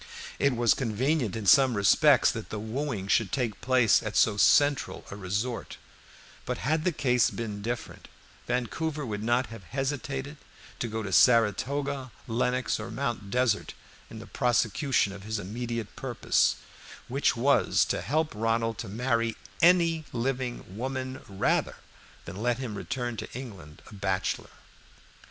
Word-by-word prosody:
It 140 -2 +2
was 120 -1 +4
convenient 125 - 0
in 110 -2 -4
some 130 +2 +6
respects 100 -1 +5
that - - -7
the 105 - -4
wooing 110 -1 -3
should 100 -1 +2
take 120 -6 -2
place 125 -4 +4
at - - -3
so 105 - +4
central 145 +6 +3
a - - -6
resort; 105 +5 -3 0.7
but - - -3
had 155 +5 0
the 180 - +3
case 125 -6 +2
been 105 -3 -5
different, 120 +2 -5 0.4
Vancouver 145 +5 -2
would 105 -3 -4
not 120 +3 +1
have 115 -4 -10
hesitated 135 - -3 0.4
to 120 - -1
go 110 0 -4
to 100 -2 -4
Saratoga, 130 +5 +3 0.2
Lenox, 125 +1 0
or 110 +2 -6
Mount 115 -4 -3
Desert, 120 -2 0 0.3
in - - -10
the - - -9
prosecution 120 -2 +1
of 100 - -9
his 110 +2 -3
immediate 115 +2 -5
purpose, - - +1 0.5
which 130 -1 +1
was 140 +4 +3
to - - -2
help 155 +3 0
Ronald 115 +1 0
to 110 - -5
marry 115 +1 0 0.2
any 165 -2 +4
living 125 0 -2
woman 130 +2 -4
rather 100 0 0 0.5
than - - -8
let 120 0 +1
him 125 -5 -5
return 120 +2 -4
to - - -6
England 100 - -9
a - - -14
bachelor. 95 -2 -2
120 Hz, 145 wpm, -28 LUFS, 110-135 Hz, 0.7 s, some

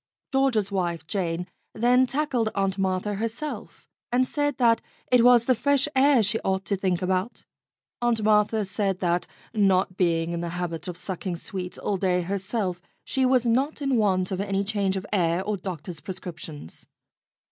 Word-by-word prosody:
George's 265 -8 +2
wife, 170 -4 -2
Jane, 175 -1 -2 0.3
then 250 +3 +4
tackled 265 -4 0
Aunt 195 -1 0
Martha 190 +2 0
herself, 230 +8 -5 0.2
and 250 +1 +3
said 290 0 -1
that 230 -2 +4 0.3
it 250 -2 +6
was 245 -1 +6
the 255 - +4
fresh 280 +3 +2
air 265 -3 +5
she 220 +3 +2
ought 190 0 -1
to 200 - 0
think 185 -1 -1
about. 185 +4 -2 0.6
'Aunt 235 -2 +1
Martha 210 0 +3
said 195 -1 -1
that, 175 -1 0 0.3
not 195 -3 +2
being 165 -2 +1
in 170 0 -3
the 170 - -3
habit 175 -1 -4
of 175 -2 -5
sucking 185 -1 -4
sweets 180 +1 -5
all 200 - -1
day 180 -1 +1
herself, 195 0 -2 0.2
she 265 -1 +1
was 255 -1 +3
not 265 +7 +1
in 275 -3 0
want 190 -5 +2
of 190 0 -1
any 200 -1 0
change 200 -2 0
of 190 - -5
air 175 -2 +1
or 210 +1 -1
doctor's 180 -3 -6
prescriptions. 170 - -8
195 Hz, 170 wpm, -25 LUFS, 180-235 Hz, 0.6 s, it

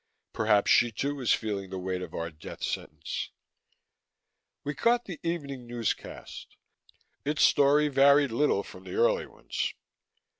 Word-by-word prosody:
Perhaps 105 -2 +3
she, 120 -1 +5
too, 140 +6 -2
was 130 -5 0
feeling 100 -3 -1
the 95 - -5
weight 90 0 -3
of 90 - -7
our 85 0 -3
death 80 0 -10
sentence. - - -4 1.3
We 145 - -2
caught 235 - +2
the 180 -5 -7
evening 140 -7 -4
newscast; 120 -2 -5 0.7
its 150 +1 +1
story 145 +1 +5
varied 140 -1 +5
little 145 +6 +2
from - - -12
the - - -6
early 480 +1 +2
ones. - - -4
140 Hz, 140 wpm, -28 LUFS, 105-150 Hz, 1.3 s, she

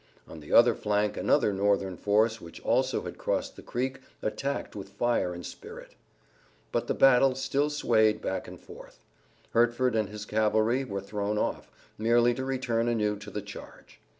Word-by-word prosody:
On 80 - -10
the 75 - -12
other 120 0 +7
flank 105 -1 0
another 105 - +2
Northern 100 -1 +1
force 110 +4 +1
which 85 - -11
also - - +1
had - - -8
crossed - - -2
the - - -11
creek 130 +2 -3 0.2
attacked 135 +6 -3
with 100 -1 -7
fire 120 -4 0
and 90 0 -7
spirit. - - -10 0.8
But - - -1
the - - 0
battle 135 0 +5
still 140 +2 0
swayed 110 -7 +2
back 95 - -3
and - - -10
forth. - - -14 0.5
Hertford 120 +1 +2
and 110 -3 0
his 105 0 -7
cavalry 110 +4 +1
were 100 -6 -4
thrown 105 +1 -3
off, - - -2 0.3
merely 120 +2 +3
to 130 - -4
return 125 -3 -1
anew 105 -3 +1
to 105 - -10
the 105 - -5
charge. 105 0 -12
110 Hz, 170 wpm, -28 LUFS, 105-125 Hz, 0.8 s, other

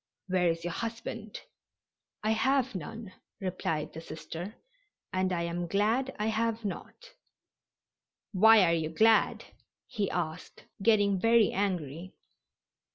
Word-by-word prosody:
"Where 180 -1 +2
is 165 0 0
your 175 -1 -3
husband?" 230 -1 -5 0.8
"I 215 - +2
have 265 +3 +2
none," 205 +3 -7 0.3
replied 165 -5 -3
the 160 - -7
Sister, 170 +5 -7 0.6
"and 185 0 +1
I 170 -1 0
am 170 +1 -3
glad 225 +8 +1
I 210 - -1
have 225 0 -1
not." 485 - -7 1.2
"Why 220 +1 +7
are 170 -2 +3
you 160 -2 0
glad?" 220 +7 +3 0.4
he 210 -6 -2
asked, 170 0 -5 0.2
getting 205 -3 +3
very 230 +1 +4
angry. 180 -3 -3
200 Hz, 120 wpm, -30 LUFS, 175-225 Hz, 1.2 s, Why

